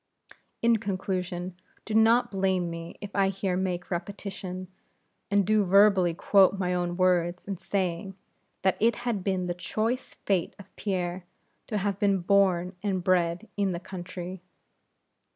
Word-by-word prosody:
In 235 -1 +5
conclusion, 185 -3 -3 0.3
do 220 - -4
not 230 +2 +4
blame 190 -3 0
me 165 0 -7
if 205 -1 -8
I 195 -1 +3
here 195 -1 -1
make 180 -1 -2
repetition, 185 0 -5 0.6
and 200 -1 +3
do 215 +1 +3
verbally 195 -2 +5
quote 195 +2 +4
my 180 -1 0
own 175 -1 -1
words 180 -1 +1
in 195 -2 -3
saying 190 -1 -2 0.5
that 190 -1 +2
it 230 +2 +3
had 220 -6 -1
been 190 -2 0
the 175 - -1
choice 220 +8 -2
fate 190 -4 0
of 200 - -15
Pierre 180 -2 -2 0.4
to 215 - -2
have 200 -1 -1
been 200 -1 +3
born 185 -1 +2
and 190 -3 -1
bred 180 +2 +1
in 200 -2 +1
the 170 - -3
country. 180 0 -7
190 Hz, 150 wpm, -27 LUFS, 180-200 Hz, 0.6 s, In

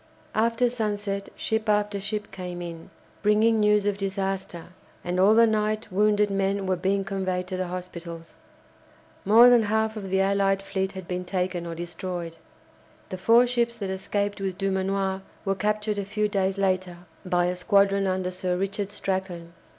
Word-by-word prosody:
After 230 +2 +2
sunset 205 -4 -3
ship 220 0 -1
after 210 -1 +1
ship 210 +1 -4
came 180 -2 -6
in, 170 -2 -8 0.3
bringing 215 +2 +3
news 210 -1 +3
of 205 -1 0
disaster, 190 -3 -3 0.3
and 180 +1 -2
all 200 +3 +6
the 230 +1 +7
night 215 -1 -1
wounded 210 +1 +2
men 195 0 0
were 185 0 +1
being 195 +2 0
conveyed 185 -2 -2
to 185 - -3
the 185 0 -2
hospitals. 170 -2 -7 0.9
More 225 +5 +8
than 245 -1 +6
half 220 +1 0
the 190 -3 -2
allied 195 0 +2
fleet 190 -1 -2
had 190 -2 -8
been 180 0 -3
taken 180 -1 -2
or 165 - -5
destroyed. 175 0 -5 0.7
The 185 - -6
four 230 +5 +5
ships 240 -1 0
that 195 -4 -3
escaped 200 +1 -2
with 190 -2 -3
Dumanoir 195 0 -1 0.2
were 195 - +2
captured 210 +1 -1
a 200 - -3
few 210 +1 0
days 195 -2 0
later 185 -2 0 0.3
by 175 -1 +1
a 180 +1 0
squadron 195 +1 +3
under 185 -1 -1
Sir 180 0 -2
Richard 195 +1 -2
Strachan. 185 -4 -4
195 Hz, 165 wpm, -26 LUFS, 185-210 Hz, 0.9 s, More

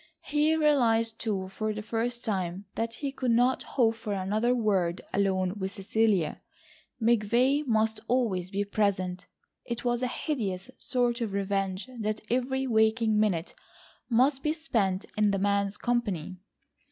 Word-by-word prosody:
He 300 +2 +2
realised 230 -7 +2
too, 195 -4 -2
for 215 +3 -2
the 215 0 -5
first 235 +2 -2
time, 190 -3 -2
that 230 0 -3
he 280 -2 -3
could 260 -2 -2
not 245 +3 +3 0.2
hope 230 -3 +4
for 220 -2 -5
another 210 +6 +1
word 195 -7 +1
alone 190 -2 +1
with 190 0 -3
Cecilia. 200 -3 +1 0.6
McVay 240 +5 +3
must 220 -1 +2
always 215 -8 0
be 200 +1 -1
present. 200 -2 -1 0.4
It 235 0 -5
was 240 0 +1
a 255 - +1
hideous 235 - -3
sort 245 -1 0
of 220 -4 -2
revenge 195 0 -1
that 215 0 -2
every 265 +2 0
waking 220 -2 +3
minute 185 -6 0 0.6
must 260 +3 +3
be 305 +2 +1
spent 215 - -1
in 210 -1 +3
the 200 - +1
man's 200 0 +1
company. 200 -8 -2
220 Hz, 145 wpm, -28 LUFS, 195-245 Hz, 0.6 s, hope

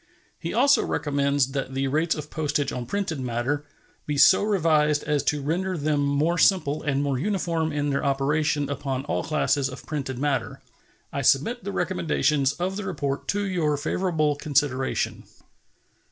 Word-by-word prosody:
He 165 - -4
also 275 +5 +4
recommends 140 -2 0
that 135 -1 -4
the 135 0 0
rates 155 +4 +1
of 150 0 -7
postage 150 -2 -1
on 120 -1 -5
printed 185 -3 -2
matter 130 +4 -2 0.4
be 150 -1 -1
so 185 - +7
revised 155 -7 +2
as 150 -1 0
to 145 -1 0
render 180 +5 -1
them 150 -1 0
more 145 +5 +1
simple 155 -7 +3
and 140 -2 0
more 140 -3 -1
uniform 170 -3 -1
in 145 -1 -1
their 140 - -1
operation 145 +1 +1
upon 135 -1 -3
all - - -1
classes 140 -3 +1
of 130 - -10
printed 135 -4 -4
matter. 135 -5 -1 0.5
I 140 - -1
submit 150 - +2
the 200 - -3
recommendations 155 -6 +1
of 180 +5 -3
the 210 - -4
report 145 -6 -3
to 205 0 0
your 165 -6 0
favorable 155 -1 0
consideration. 140 -3 -1
150 Hz, 160 wpm, -25 LUFS, 140-165 Hz, 0.5 s, so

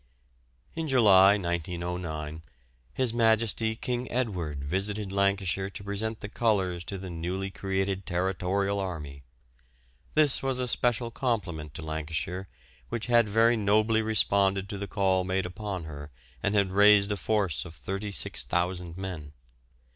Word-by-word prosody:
In 165 -1 -3
July, 100 -7 +6
1909, 85 -3 -4 0.5
His 130 -3 +1
Majesty 110 -1 +2
King 125 +1 -3
Edward 90 - -2
visited 100 +6 -2
Lancashire 100 -1 0
to 100 +1 -9
present 105 +2 -3
the 105 - -5
colours 95 -6 0
to 100 - -5
the 95 -1 -7
newly 90 +4 -3
created 95 0 -2
Territorial 95 +2 0
Army. 75 -7 -5 0.9
This 150 -3 +4
was 135 -1 -1
a 125 - 0
special 120 -1 +1
compliment 95 - -2
to 80 - -6
Lancashire, 80 +4 -4 0.4
which 110 +6 -3
had 120 -3 +4
very 115 +3 +4
nobly 110 +1 +2
responded 100 -3 +2
to 100 - -5
the 100 - -4
call 95 -3 +1
made 95 +1 -1
upon 95 0 -5
her 75 -2 -8 0.3
and 100 +2 0
had 100 -2 +2
raised 100 +1 +6
a - - +1
force 100 -3 0
of 80 - -11
36,000 90 - -1
men. 85 -6 -6
95 Hz, 135 wpm, -28 LUFS, 90-110 Hz, 0.9 s, July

